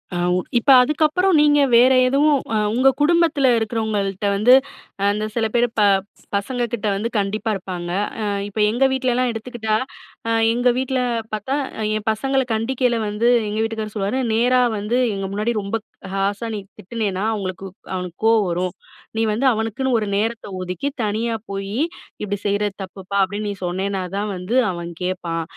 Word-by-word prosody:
ஆ. - - -1 0.2
உ - - +2 0.2
இப்ப 255 +4 +3
அதுக்கப்புறம் 310 +6 +2
நீங்க 295 -1 +5 0.2
வேறு 255 +2 +6
எதுவும் 285 +2 +3 0.2
ஆ - - +3 0.2
உங்க 255 +3 +3
குடும்பத்தில 315 -4 +3
இருக்கிறவங்கள்ட்ட 215 -3 -1
வந்து, 215 +5 +5 0.6
அந்த 210 +1 -1
சில 230 -2 +1
பேர் 240 0 +3
ப - - +5 0.5
பசங்க 245 +5 -1
கிட்ட 215 -2 -2
வந்து 215 +4 -2
கண்டிப்பா 210 +3 -2
இருப்பாங்க. 180 -2 -5 0.3
ஆ - - -1 0.2
இப்ப 205 +1 -6
எங்க 245 +4 +1
வீட்லலாம் 255 -1 +1
எடுத்துக்கிட்டா, 225 -1 -3 0.5
ஆ 230 - +1 0.2
எங்க 245 +1 +2
வீட்டில 260 0 0 0.3
பார்த்தா 215 +6 -2 0.2
ஆ - - -2 0.2
என் 215 - -7
பசங்கள 270 +5 0
கண்டிக்கையில 240 +2 0
வந்து 210 +3 0 0.2
எங்க 210 +1 -3
வீட்டுக்காரு 220 -1 -4
சொல்லுவாரு, 205 +5 -1
நேராவந்து 240 -1 +2 0.2
எங்க 195 0 -3
முன்னாடி 215 +4 0
ரொம்ப 200 +3 -2 0.3
ஹார்ஷா 200 +3 -1
நீ - - -3 0.2
திட்டினன்னா, 200 -1 -3
அவங்களுக்கு 195 -2 -4 0.3
அவனுக்கு 180 -2 -5
கோவம் 225 -2 +4
வரும். 180 +2 -1 0.4
நீ - - +2
வந்து 235 +6 -1
அவனுக்குன்னு 225 +4 -1
ஒரு 210 - -2
நேரத்த 225 +2 -2
ஒதுக்கி 180 +7 -3 0.2
தனியா 220 +2 -1 0.2
போயி, 195 +1 -4 0.5
"இப்படி 205 -1 -2
செய்யறது 205 0 0
தப்புப்பா" 190 +1 -6
அப்படின்னு 205 +2 -3
நீ 200 - -5
சொன்னேனா 190 +2 -2 0.2
தான் 210 +1 -2
வந்து 185 +7 -3 0.2
அவன் 170 -1 -6
கேப்பான். 175 -2 -2
220 Hz, 155 wpm, -21 LUFS, 200-245 Hz, 0.6 s, வேறு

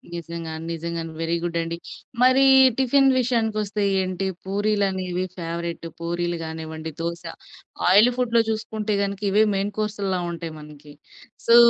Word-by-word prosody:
నిజంగా, 170 -1 -6 0.2
నిజంగాను 165 0 -4
very 165 +1 0
good 170 -1 -2
అండి. 165 0 -4 0.5
మరి 255 +1 +6 0.3
టిఫిన్ 270 +1 +4
విషయానికొస్తే 220 -4 0 0.2
ఏంటి 185 +1 -2 0.2
పూరీలనేవి 190 -3 0
ఫేవరెట్. 170 0 -4
పూరీలు 175 0 -2
గానివ్వండి, 160 0 -6
దోస 170 +1 -3 0.7
ఆయిలీ 210 +6 +7
ఫుడ్‌లో 235 -2 +3
చూసుకుంటే, 220 -1 -2
గనక 200 0 -3
ఇవే 210 +2 +4
మెయిన్ 200 +1 -1
కోర్సుల 200 -3 -1
ఉంటాయి 165 -1 -6
మనకి. 150 -1 -13 0.5
సో, 230 - +7
185 Hz, 125 wpm, -24 LUFS, 170-215 Hz, 0.7 s, ఆయిలీ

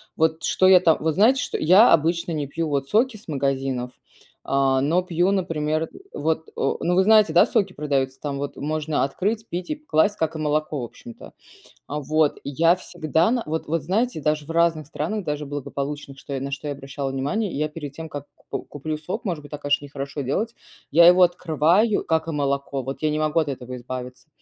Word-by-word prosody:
Вот 160 0 +1
что 185 - +3
я 185 -1 +8
там 165 -3 +4
вот 160 0 0
знаете, 230 - +4
что - - -3
я 190 +9 +6
обычно 165 +2 +1
не 150 -3 -2
пью 165 +4 -3
вот 140 -1 -1
соки 230 - +2
с 215 - -16
магазинов, 135 -4 -1 0.5
а, 135 -1 +2
но 170 +6 +2
пью, 175 +1 +1
например, 160 -4 -1 0.3
вот 160 +1 -2
о, - - 0
ну, 175 +1 +2
вы 190 - +5
знаете, 215 -5 +5
да, 170 - +7
соки 200 - 0
продаются: 135 -3 -1
там 140 -1 -4
вот 140 0 -4
можно 155 +1 -1
открыть, 210 +10 -2
пить 175 +1 -4
и 305 - -1
п 300 0 -23
класть, 205 - +2
как 160 0 -1
и - - -4
молоко, 150 -2 -1
в - - -3
общем-то, 115 0 -12 0.6
а, 150 +1 -3
вот. 155 +1 +1
Я 165 +5 +3
всегда 160 0 0
на 245 -2 0
вот 160 +1 -3
вот, 165 0 -1
знаете, 200 - 0
даже 150 0 0
в - - -10
разных 165 -2 +2
странах 175 +8 -3
даже 150 -1 -3
благополучных, 140 0 -5
что 140 - -7
я 135 - -2
на 140 - -4
что 140 +2 -4
я 145 - -2
обращала 140 0 -5
внимание, 145 +11 -1
я, 150 +2 -1
перед 150 -2 -7
тем 160 +1 -7
как 145 -2 -7 0.2
к - - -2
куплю 155 +2 -4
сок, 180 +8 -5
может 170 -7 -3
быть, 145 - -13
так, 150 -1 -7
конечно, 145 0 +1
нехорошо 140 +1 -6
делать, 215 - -2 0.4
я 170 +3 +7
его 180 +1 +6
открываю, 175 +5 +2
как 160 0 0
и - - -2
молоко, 140 -1 -1
вот 135 +3 -6
я 155 - +2
не 150 - -1
могу 155 +1 +2
от 155 - -2
этого 130 -2 -6
избавиться, 125 +3 -8
155 Hz, 215 wpm, -23 LUFS, 140-170 Hz, 0.6 s, я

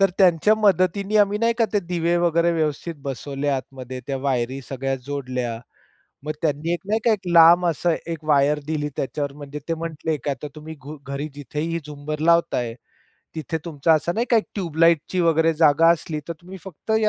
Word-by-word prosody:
तर 195 -1 +4
त्यांच्या 185 +2 +5
मदतीने 200 0 +2
आम्ही 205 0 +3
नाही 230 +1 +2
का 230 - +4
ते 205 - +2
दिवे 170 -1 0
वगैरे 170 0 +2
व्यवस्थित 160 +1 -2
बसवले 140 +1 -4
आतमध्ये. 130 -2 -4
त्या 140 - -2
वायरी 130 -1 -1
सगळ्या 135 0 -2
जोडल्या. 125 -4 -3 0.7
मग 155 - -2
त्यांनी 155 +2 0
एक 175 - -1
नाही 215 +2 +1
का 230 - +5
एक 200 -4 -3
लांब 170 +1 +7
असं 170 +1 +1 0.2
एक 160 -1 -7
वायर 150 0 +3
दिली. 150 -1 -2
त्याच्यावर 140 +1 -3
म्हणजे 145 0 -8
ते 165 - +1
म्हंटले 160 -1 -3
की, 145 - -4
"आता 140 +2 -5
तुम्ही 155 +1 -9
घु 150 +3 -9
घरी 140 +2 -4
जिथेही 150 +4 -3
झुंबर 150 +1 -5
लावताय, 125 -9 +2 0.6
तिथे 160 0 -3
तुमचा 160 0 +1
असा 155 +3 0
नाही 230 +6 -1
का 235 - +5
एक 220 - +2
ट्यूब 175 -6 -4
लाइटची 165 +2 +3
वगैरे 165 -1 +3
जागा 160 +1 +5
असली, 155 -2 -4
तर - - -1
तुम्ही 185 +2 -10
फक्त 190 +3 -9
या 215 - +3
160 Hz, 190 wpm, -23 LUFS, 145-175 Hz, 0.7 s, लांब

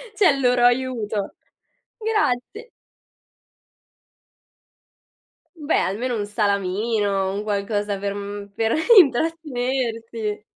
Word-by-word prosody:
cioè 405 -4 +5
il 275 -1 +1
loro 250 -1 +2
aiuto. 240 -5 0 0.7
Grazi 430 - -1 2.9
Beh, 300 0 0
almeno 230 +5 -2
1 205 - -2
salamino, 200 -1 0
un 200 - -3
qualcosa 205 0 -2
per, 200 0 -3
mhmm, 200 0 -6
per 225 +1 0 0.3
intrattenerti. 245 - -1
225 Hz, 85 wpm, -22 LUFS, 205-255 Hz, 2.9 s, cioè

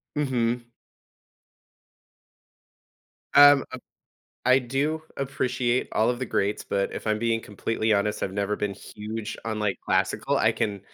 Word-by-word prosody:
Mhm. 120 -4 0 2.7
Um, 145 -1 +8
uh - - -5 0.7
I 130 +1 +6
do 140 +5 -1 0.2
appreciate 130 -2 -1
all 110 +2 +2
of 120 0 0
the 130 - -2
greats, 100 -2 -1
but 100 0 -1
if - - -7
I'm 110 0 +1
being 115 0 +1
completely 110 +1 -1
honest, 105 +1 0
I've 95 - -2
never 100 +1 -1
been 105 -1 -2
huge 105 +2 -7
on, 110 -1 -3
like, 105 -2 0
classical. - - +1
I - - +3
can 100 -2 -2
115 Hz, 135 wpm, -26 LUFS, 105-130 Hz, 2.7 s, Um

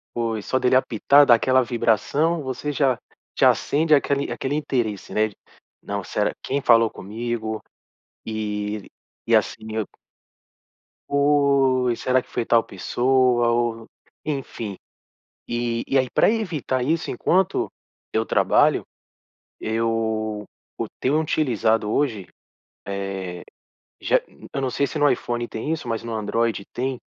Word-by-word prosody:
Pois 115 -3 -2
só 130 - +1
dele 130 0 +3
apitar, 135 +3 +5
dar 125 - +7
aquela 130 +3 +3
vibração, 125 +8 +1
você 130 +3 -3
já 135 -4 +1 0.4
já - - +6
acende 155 +1 +3
aquele 140 0 0
aquele 135 - -3
interesse, 120 -11 -2
né. 110 +2 +1 0.5
Não, 100 0 -4
será 105 +3 0
quem 140 +1 -1
falou 115 -3 +5
comigo 110 +1 -4 0.7
e 105 -1 -3 0.4
e - - +3
assim, 110 0 -1
eu 110 -1 0 1.2
Pois, 140 -4 +3
será 130 0 +2
que - - -22
foi 115 - -2
tal 115 0 +4
pessoa 125 +4 +2
ou 115 -1 -1 0.4
enfim, 125 -8 -4 0.7
e 120 -1 -1
e 135 - +2
aí 130 -1 +2
pra - - +4
evitar 165 - -1
isso, 160 +3 0
enquanto 190 +1 +1 0.4
eu 110 0 +1
trabalho - - +3 0.8
eu 110 -1 -1 0.3
eu - - -1
tenho 145 +4 +2
utilizado 115 -8 +1
hoje, 115 -9 0 1.8
eh, - - -14
já - - +4 0.3
eu 140 - -2
não 130 -1 -1
sei 140 +4 0
se 155 - -5
no 145 0 +5
iPhone 120 0 -2
tem 110 +8 -3
isso, 160 -5 -4
mas 115 -1 -2
no 115 - -5
Android 110 0 0
tem, 130 +1 -2
120 Hz, 135 wpm, -23 LUFS, 110-140 Hz, 1.8 s, dar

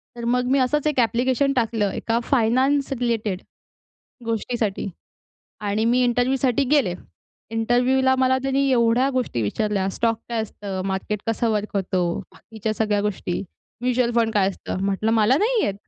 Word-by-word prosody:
तर 235 -1 -6
मग 250 +1 +1
मी 275 - +4
असंच 295 +4 +1
एक 295 -4 0
ॲप्लिकेशन 255 +4 +2
टाकलं 225 -5 0
एका 230 0 -1
फायनान्स 265 +3 +2
रिलेटेड 220 -5 -1 0.8
गोष्टीसाठी 225 -2 -2 0.8
आणि 210 +2 0
मी 245 +2 +3
इंटरव्ह्यूसाठी 250 +2 +1
गेले. 270 -12 +3 0.6
इंटरव्ह्यूला 250 +3 +2
मला 260 0 +3
त्यांनी 270 +1 +1
एवढ्या 235 +2 +3
गोष्टी 250 - -1
विचारल्या 195 - -1
स्टॉक 230 +3 0
काय 230 -2 -1
असतं, 200 -3 -6
मार्केट 195 +2 -2
कसं 225 0 0
वर्क 210 -1 -2
होतो, 185 -2 0 0.3
बाकीच्या 220 -1 -5
सगळ्या 210 -2 +1
गोष्टी, 195 -3 -2 0.4
म्युच्युअल 250 -1 +1
फंड 225 -1 +2
काय 195 -2 +3
असतं? 195 0 -4
म्हटलं 200 +3 0
मला 225 +4 +4
नाही 450 +2 +2
येत. 195 - -1
230 Hz, 145 wpm, -23 LUFS, 210-255 Hz, 0.8 s, मी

